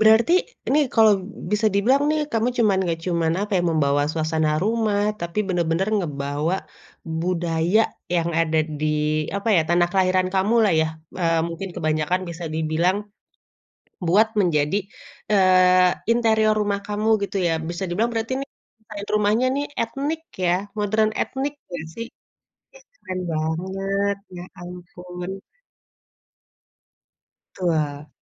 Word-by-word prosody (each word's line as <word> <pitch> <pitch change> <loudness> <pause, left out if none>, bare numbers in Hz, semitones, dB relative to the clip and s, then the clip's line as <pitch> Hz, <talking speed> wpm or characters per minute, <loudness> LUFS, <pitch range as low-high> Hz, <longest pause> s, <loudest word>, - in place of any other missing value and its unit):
Berarti 220 +8 +5 0.4
ini 295 - +3 0.2
kalo 220 -1 +6 0.4
bisa 210 +1 +2
dibilang 250 +8 +3
nih 310 0 +1
kamu 230 +1 +1
cuman 210 -5 +3
nggak 165 -1 -1
cuman, 170 -2 +1
apa 205 +1 -3
ya, 175 - +2
membawa 145 -2 +2
suasana 160 -1 0
rumah 215 -1 +1 0.2
tapi 170 +4 -4
bener-bener 175 +1 0
ngebawa 145 0 -2 0.7
budaya 175 +2 +1 0.4
yang 170 0 0
ada 160 -1 +1 0.2
di, 155 - -1 0.5
apa 200 +3 -3
ya, - - +5
tanah 175 +1 +3
kelahiran 185 -1 +2
kamu 195 +4 +2
lah 205 - +3
ya, 160 - +2 0.3
eee, 165 -1 +2
mungkin 170 +4 -5
kebanyakan 155 +3 0
bisa 170 0 -6
dibilang 160 +4 +1 1.1
buat 205 +6 +5
menjadi, 155 -2 +2 0.5
eee, 185 -2 +5 0.2
interior 220 -2 +3
rumah 205 -1 0
kamu 210 +1 -2 0.2
gitu 200 - -3
ya, 165 - +1 0.2
bisa 175 +2 -4
dibilang 220 +7 0
berarti 225 +2 -2
ini, 275 - -4 0.3
desain 210 -2 -9
rumahnya 210 +4 +2
ini 280 - -1 0.2
etnik 285 +7 -2 0.2
ya 175 - +3 0.3
modern 215 +1 +2
etnik 275 +2 -2 0.2
nggak 175 -3 -5
sih? 230 - -5
Ih - - -76 0.7
keren 185 0 -4
banget 190 +5 -1 0.2
ya 175 - -6 0.2
ampun. 180 0 -8 2.3
Tua. 155 -5 -1
185 Hz, 130 wpm, -23 LUFS, 165-215 Hz, 2.3 s, kalo